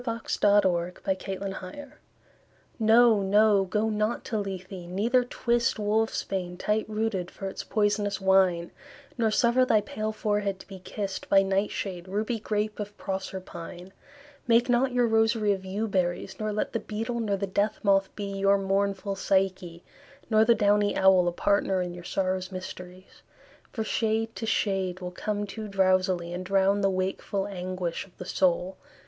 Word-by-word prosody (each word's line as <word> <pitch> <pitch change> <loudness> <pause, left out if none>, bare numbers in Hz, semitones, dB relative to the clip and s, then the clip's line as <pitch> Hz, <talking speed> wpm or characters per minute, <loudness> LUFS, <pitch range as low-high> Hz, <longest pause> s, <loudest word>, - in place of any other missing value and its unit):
John 230 -2 -3
Keats - - -3
Ode 205 0 +5
on 175 -1 0 0.2
Melancholy 190 +5 -5 0.9
NO, 225 -1 +5
no, 205 0 +4
go 210 +4 0
not 215 +2 -1
to 220 - -2
Lethe, 190 -2 -5 0.2
neither 230 +7 +2
twist 240 -1 0
Wolf's 215 +1 0
bane, 180 -2 -4
tight 215 +3 -1
rooted, 215 -4 -2
for 195 - -9
its 190 - -5
poisonous 205 -1 0
wine; 190 -3 +3 0.5
Nor 225 -1 +3
suffer 235 +3 +3
thy 220 -4 +3
pale 215 +1 -4
forehead 205 -2 -1
to - - -13
be 195 -1 -10
kiss'd 195 +1 -5
By 195 0 +6
nightshade, 195 -2 -2
ruby 215 +4 -2
grape 210 0 -2
of 205 0 -6
Proserpine; 190 -2 -6 0.6
Make 235 +2 +4
not 250 +2 +3
your 245 -1 +2
rosary 225 -1 +2
of 190 -1 -6
yew 205 +4 -2
berries, 185 -1 -2
Nor 215 0 -1
let 210 - -2
the 230 - 0
beetle, 225 +3 -4
nor 205 -3 0
the 200 - -2
death 200 +2 0
moth 195 -1 +3
be 205 - -5
Your 195 0 +3
mournful 195 0 -1
Psyche, 190 -3 -1 0.5
nor 215 0 +6
the 235 +1 +5
downy 205 -1 +2
owl 190 -2 +5
A - - +2
partner 195 +1 +1
in 180 -1 -3
your 175 0 -9
sorrow's 185 +1 -2
mysteries; 185 0 -9 0.5
For 220 - -3
shade 225 0 -1
to 225 - -4
shade 190 -4 0
will 180 -1 -5
come 205 +2 -3
too 215 +2 -7
drowsily, 185 -3 +1
And 180 +1 -4
drown 195 +1 +2
the 195 - +3
wakeful 190 +1 -2
anguish 185 -2 -4
of 180 - -26
the 180 - -7
soul. 185 0 +1
200 Hz, 165 wpm, -27 LUFS, 185-215 Hz, 0.9 s, By